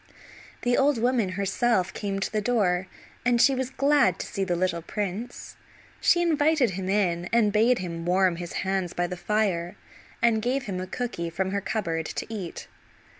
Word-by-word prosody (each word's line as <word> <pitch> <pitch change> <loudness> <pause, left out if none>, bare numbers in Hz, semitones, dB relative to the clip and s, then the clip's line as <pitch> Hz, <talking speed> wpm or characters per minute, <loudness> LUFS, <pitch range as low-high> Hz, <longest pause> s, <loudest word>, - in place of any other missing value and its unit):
The 245 0 +2
old 280 -1 +3
woman, 230 -5 +1
herself, 195 -1 +1
came 200 -2 -3
to - - -2
the 215 -1 0
door, 190 -6 +1 0.4
and 245 -1 +3
she 275 - +6
was 260 -1 -2
glad 280 +2 +3
to - - -5
see 195 -4 -3
the 180 -2 0
little 175 -1 0
prince. 205 +6 -5 0.4
She 345 0 +4
invited 310 - +3
him 185 +1 -4
in, 175 -4 +1
and 220 -3 +3
bade 230 +4 +4
him 170 -2 -5
warm 180 0 +2
his 175 0 -6
hands 190 -2 -1
by 175 - 0
the 180 +1 -4
fire, 180 -3 -1 0.4
and 230 -2 +3
gave 255 +4 0
him 190 -6 -4
a 185 - -5
cooky 210 -6 -3
from 190 +3 -2
her 200 0 -1
cupboard 165 -7 -2
to - - -4
eat. 190 -6 -6
200 Hz, 180 wpm, -26 LUFS, 180-240 Hz, 0.4 s, she